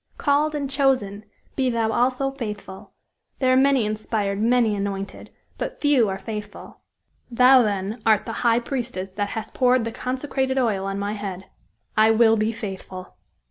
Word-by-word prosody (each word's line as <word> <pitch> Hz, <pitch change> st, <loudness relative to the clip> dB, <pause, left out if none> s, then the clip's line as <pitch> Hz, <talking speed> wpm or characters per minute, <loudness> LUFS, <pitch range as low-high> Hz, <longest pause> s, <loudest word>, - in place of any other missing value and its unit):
'Called 300 Hz, +1 st, +1 dB
and 285 Hz, -2 st, -2 dB
chosen,' 260 Hz, -7 st, 0 dB, 0.3 s
be 260 Hz, -2 st, +1 dB
thou 230 Hz, -2 st, 0 dB
also 255 Hz, +4 st, +1 dB
faithful. 210 Hz, -7 st, -8 dB, 0.4 s
There 255 Hz, -1 st, +2 dB
are -, -, +4 dB
many 265 Hz, -3 st, +3 dB
inspired, 210 Hz, -1 st, -2 dB
many 230 Hz, -2 st, +3 dB
anointed; 195 Hz, -1 st, -5 dB, 0.3 s
but -, -, -4 dB
few 275 Hz, -8 st, +3 dB
are 190 Hz, -, -3 dB
faithful!" 210 Hz, 0 st, -8 dB, 0.5 s
"Thou, 255 Hz, +2 st, +6 dB
then, 205 Hz, +1 st, -2 dB
art 215 Hz, -1 st, +3 dB
the -, -, -5 dB
high 235 Hz, -1 st, +3 dB
priestess 235 Hz, -7 st, -4 dB
that 205 Hz, +1 st, -3 dB
hast 220 Hz, 0 st, -6 dB
poured 250 Hz, -2 st, +3 dB
the 230 Hz, -, -3 dB
consecrated 265 Hz, +2 st, -2 dB
oil 215 Hz, -7 st, 0 dB
on 195 Hz, 0 st, -3 dB
my 200 Hz, +1 st, -2 dB
head. 195 Hz, -3 st, -6 dB, 0.5 s
I 215 Hz, +1 st, +5 dB
will 225 Hz, 0 st, +5 dB
be 215 Hz, +1 st, 0 dB
faithful!" 190 Hz, -4 st, -8 dB
225 Hz, 160 wpm, -23 LUFS, 205-255 Hz, 0.5 s, Thou